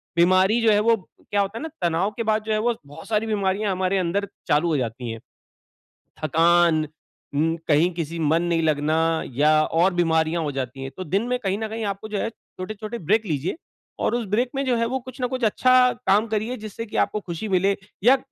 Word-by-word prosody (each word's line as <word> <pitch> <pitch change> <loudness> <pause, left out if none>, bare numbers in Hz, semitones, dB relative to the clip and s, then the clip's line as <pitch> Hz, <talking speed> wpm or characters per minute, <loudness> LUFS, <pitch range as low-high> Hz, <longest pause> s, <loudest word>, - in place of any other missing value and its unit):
बीमारी 185 +6 +4
जो 225 - +4
है 205 - +4
वो 230 +2 +4 0.4
क्या 205 - +3
होता 200 +3 -3
है - - -6
ना 320 - -4 0.2
तनाव 175 +5 0
के 230 - -1
बाद 215 0 +1
जो 220 - -4
है - - +2
वो 240 0 +1
बहुत 145 +3 -11
सारी 220 0 0
बीमारियाँ 200 -1 0
हमारे 185 +1 0
अंदर 190 +3 0 0.2
चालू 150 +4 +3
हो 155 - +1
जाती 120 -1 -3
है, 115 - -7 1.0
थकान, 165 0 +3 0.5
म 160 +3 +2
कहीं 155 +3 +4
किसी 165 -1 -4
मन 160 +1 +2
नहीं 170 -1 +1
लगना 155 0 +1 0.4
या 150 +3 +4
और 175 +5 +2
बीमारियाँ 165 -1 +1
हो 150 - -2
जाती 135 -1 -5
है 135 - -5
तो 185 - -4
दिन 190 +4 0
में 250 0 0
कहीं 195 0 0
न 220 - -2
कहीं 220 0 -4
आपको 200 +2 -4
जो 210 - -2
है, 225 - -1
छोटे-छोटे 215 +1 -8
ब्रेक 215 +5 +2
लीजिये 155 - -2 0.4
और - - +1
उस 240 -2 -2
ब्रेक 240 +5 +1
में 275 - 0
जो 255 -2 +2
है 230 - +1
वो 260 +2 -2
कुछ 255 +1 -11
न 250 - +1
कुछ 255 0 -4
अच्छा 255 +3 +4 0.2
काम 205 +4 +4
करिए 220 +3 -2
जिससे 215 +1 -7
की 215 - -6
आपको 210 - -4
ख़ुशी 175 +3 -5
मिले, 195 +2 +2 0.3
या 255 +4 +6
195 Hz, 220 wpm, -23 LUFS, 165-220 Hz, 1.0 s, या